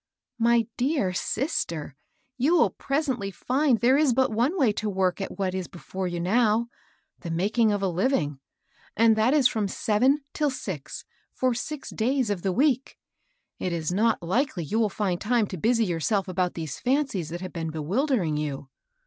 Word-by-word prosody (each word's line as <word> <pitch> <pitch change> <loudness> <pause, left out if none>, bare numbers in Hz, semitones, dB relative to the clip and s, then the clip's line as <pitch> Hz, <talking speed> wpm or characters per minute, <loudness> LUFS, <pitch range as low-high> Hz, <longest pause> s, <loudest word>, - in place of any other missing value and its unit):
" - - -55
My 235 -1 +4
dear 250 - +1
sister! 175 - -2 0.4
you 280 +7 +2
will 325 - +4
presently 275 -8 -2
find 255 +6 +1
there 250 +4 +4
is 285 -6 +3
but 260 -2 +2
one 245 - +1
way 260 -9 +4
to 215 +1 -3
work 190 -1 0
at - - -5
what 190 -2 -1
is 185 -1 -3
before 185 +1 -5
you 175 -1 -3
now, 220 +5 +2 0.2
— - - -43
the 170 - -6
making 210 +7 +2
of 205 -1 -1
a 190 - +1
Kving, 170 - 0 0.3
— - - -32
and 225 0 +5
that 225 +6 +3
is 275 -5 +5
from 215 -4 -1
sev 210 +2 -1
en 275 +3 +4
till 300 -2 +1
six, 180 - -6 0.3
for 255 -1 0
six 285 +5 -5
days 250 0 0
of 195 -4 -2
the 190 - 0
week. 265 +4 +1 0.6
It 185 - -2
is 165 -1 -2
not 215 +1 +1
likely 200 - 0
you 215 +9 -1
will 220 -2 +2
find 190 -3 -2
time 235 0 +2
to 190 - -6
busy 230 +6 +2
yourself 190 +3 0
about 180 -1 -1
these 160 -4 -5
fancies 255 - 0
that 175 +2 -6
have 185 - -6
been 165 -1 -3
bewildering 175 - 0
you." 145 -2 -4
215 Hz, 190 wpm, -26 LUFS, 180-255 Hz, 0.6 s, and